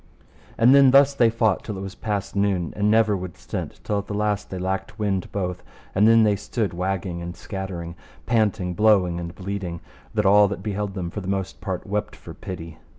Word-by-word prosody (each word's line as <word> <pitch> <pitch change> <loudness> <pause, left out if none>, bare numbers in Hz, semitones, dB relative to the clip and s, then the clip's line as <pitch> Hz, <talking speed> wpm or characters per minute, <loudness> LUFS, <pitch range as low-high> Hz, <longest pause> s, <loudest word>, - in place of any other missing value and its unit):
And 120 +3 +6
then 140 -1 +7
thus 140 +1 +6
they 120 -4 +4
fought 110 -3 +1
till 105 -3 -5
it - - -5
was 95 -1 -6
past 105 -3 -3
noon, 100 -4 0
and 105 0 +1
never 110 -1 +4
would 90 -2 -6
stint, - - -6
till 105 -1 0
at 100 - -7
the 105 - -4
last 105 -1 -1
they 95 - -5
lacked 95 +3 -3
wind 100 -4 -1
both; 90 -2 -3 0.3
and 105 +3 +4
then 115 0 +6
they 105 -2 +3
stood 105 -1 -2
wagging 90 -1 -2
and 85 0 -6
scattering, 90 -3 -6 0.3
panting, 105 -6 +1
blowing 95 -3 +3
and 85 0 -6
bleeding, 95 -3 -4 0.4
that 105 -1 +1
all 100 +1 +6
that 95 -1 -5
beheld 105 -1 -3
them 90 -3 -4
for 105 - -5
the 95 - -8
most 95 -1 -3
part 95 -2 -4
wept 105 0 -3
for - - -11
pity. 85 -3 -8
100 Hz, 210 wpm, -24 LUFS, 90-105 Hz, 0.4 s, then